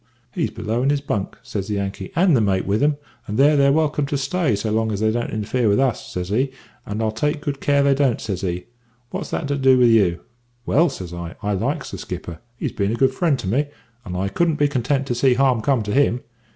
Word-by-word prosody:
"`He's - - 0
below 110 +1 -2
in 135 - +2
his 145 0 +2
bunk,' 105 -8 -3
says 100 -2 -4
the 105 - -2
Yankee, 100 -1 -4
`and 175 +1 +4
the 125 - +4
mate 95 -3 +1
with 100 +3 0
him, 145 0 +2 0.3
and 105 - -3
there 145 +2 +5
they're 140 -1 +4
welcome 150 -1 +1
to 145 0 -1
stay 140 - 0
so 105 +2 -2
long 110 0 +1
as 100 - -2
they 110 0 +2
don't 120 +1 -2
interfere 110 +2 0
with 100 - +3
us,' 130 -4 0
says 90 0 -4
he, 130 +6 +1 0.4
`and 105 +2 -2
I'll 110 - +1
take 150 +7 -1
good 145 -2 -4
care 140 -1 +3
they 140 0 +4
don't,' 135 -4 +1
says 95 -4 -4
he. 90 -1 -2
`But - - -26 0.5
what's - - -4
that 150 - -2
to 145 - +1
do 130 -1 +5
with 125 -1 +5
you?' 95 -7 +3 0.5
"`Well,' 165 +4 +4
says 90 -2 -7
I, 85 0 -6
`I 100 -2 0
likes 140 - -2
the - - -6
skipper; 85 -2 -6 0.2
he's - - -3
been 100 0 -1
a - - 0
good 130 +2 +2
friend 155 -1 +1
to 120 - -5
me, 135 +9 +1 0.4
and 90 -2 -5
I 95 +2 0
couldn't 165 +10 +1
be 145 -1 +3
content 135 0 0
to 125 - -1
see 125 +1 +3
harm 130 -3 +3
come 130 -1 +1
to 105 0 -3
him. 130 -3 +2
120 Hz, 255 wpm, -21 LUFS, 105-140 Hz, 0.5 s, there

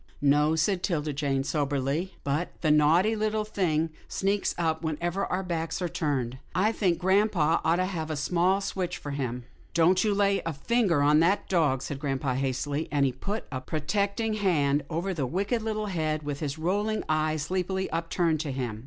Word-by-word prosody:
"No," 150 +2 +3
said 175 +4 +1
'Tilda 155 -6 -1
Jane, 135 -1 0
soberly, 145 +5 -1
"but 145 +5 -2
the 155 - +3
naughty 165 +8 +4
little 215 0 0
thing 165 -6 0 0.2
sneaks 200 +1 0
up 160 -1 0
whenever 175 +5 -1
our 185 +1 -1
backs 165 -2 -2
are 180 - -1
turned. 130 -6 -2 0.2
I 205 +5 +3
think 185 -6 +1
grampa 185 -3 +2
ought 165 - +3
to 185 +1 +1
have 165 -4 -4
a 155 - -2
small 180 +6 +1
switch 185 -2 -3
for 145 - -6
him." 125 -3 -3 0.2
" - - -28
Don't 180 +2 +4
you 210 -2 +1
lay 200 -1 +2
a 165 - -2
finger 175 - +1
on 150 +1 +5
that 190 +5 +2
dog," 150 -8 +2
said 140 - -5
grampa, 135 -2 -1
hastily, 135 +3 -1
and 145 -2 +3
he 135 - +2
put 200 - -4
a 130 -2 -3
protecting 200 - -1
hand 150 -9 +2
over 175 +4 -2
the 145 -7 -2
wicked, 200 - -1
little 215 -1 -2
head 155 -5 -1
with 145 -1 -4
the 145 -2 -3
rolling 205 +6 0
eyes, 155 -1 0
sleepily 190 +3 -1
upturned 165 0 0
to 150 -2 -3
him. 125 -5 -3
165 Hz, 190 wpm, -27 LUFS, 145-190 Hz, 0.2 s, on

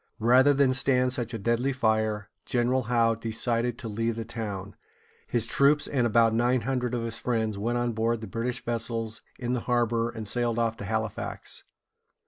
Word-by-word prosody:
Rather 125 +5 +5
than 140 -2 +3
stand 125 -1 +2
such 120 -4 -2
a 115 - -3
deadly 120 +5 0
fire, 110 -4 0 0.2
General 125 +1 +1
Howe 115 -2 +3
decided 115 +1 -1
to 120 - -7
leave 115 +2 -1
the 115 0 -4
town. 105 -4 -5 0.5
His 115 -2 0
troops, 145 +5 +3
and 125 -4 +1
about 115 0 +4
nine 120 +2 +2
hundred 125 0 -1
of 120 - -2
his 115 -1 -3
friends, 110 -3 -1
went 115 +4 -1
on 120 0 0
board 115 +1 0
the - - -5
British 120 +3 -3
vessels 115 -2 -1 0.2
in 125 -1 -2
the 125 - 0
harbor, 120 -1 +2
and 110 -3 -6
sailed 120 +1 +1
off 115 -1 +1
to 100 - -6
Hal´i 110 0 -1
fax. - - -6
115 Hz, 185 wpm, -27 LUFS, 110-125 Hz, 0.5 s, Rather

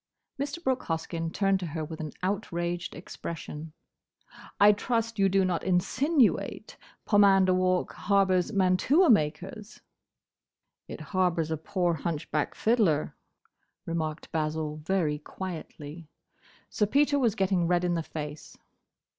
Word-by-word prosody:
Mr. 290 +4 -4
Brooke 260 -1 0
Hoskyn 165 0 -3
turned 195 0 +1
to 180 - -4
her 155 - -2
with 160 +1 -8
an 155 -2 -5
outraged 175 -3 -2
expression: 160 -2 -7 0.9
"I 205 +1 +8
trust 230 +1 -1
you 195 0 +4
do 195 0 +3
not 180 -2 -1
insinuate 255 - +1 0.3
Pomander 195 -3 +5
Walk 185 0 +1
harbours 195 -1 +2
mantua 200 - +4
makers?" 195 +5 -1 1.1
"It - - -8
harbours 175 -4 +1
a - - +1
poor, 175 +2 0
hunchback 155 -1 -2
fiddler," 185 -11 +1 0.7
remarked 160 -2 -4
Basil, 155 -1 -2
very 155 -2 0
quietly. 160 -2 -8 0.6
Sir 210 - 0
Peter 285 +4 +3
was 235 -5 +2
getting 190 -4 +1
red 175 0 +2
in 175 -1 +1
the 170 - 0
face. 150 -1 -7
180 Hz, 120 wpm, -28 LUFS, 160-205 Hz, 1.1 s, I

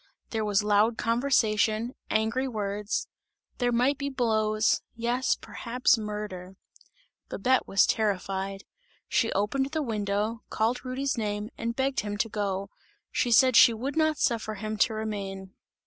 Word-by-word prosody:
There 220 -1 -1
was 205 -1 +1
loud 210 +2 +3
conversation, 230 -2 +1 0.2
angry 225 +5 +1
words; 210 -3 -2 0.5
there 245 -1 +2
might 255 +4 +2
be 280 0 -2
blows; 220 -4 +1
yes, 240 +2 0
perhaps 250 +3 0
murder. 210 -4 -6 0.7
Babette 255 +6 +1
was 195 - +4
terrified; 195 -2 -1 0.4
she 225 - +1
opened 210 +7 0
the 315 -1 0
window, 215 -1 -2
called 230 +3 0
Rudy's 260 0 -2
name 210 0 -3
and 230 0 -3
begged 265 +1 0
him 205 -1 -3
to 225 +2 0
go; 200 -2 -3 0.4
she 245 - 0
said 255 +2 +6
she 230 0 +8
would 265 +6 -4
not 315 -1 +2
suffer 220 -2 0
him 215 +1 -4
to 220 +1 +2
remain. 195 -3 -5
220 Hz, 140 wpm, -27 LUFS, 205-245 Hz, 0.7 s, she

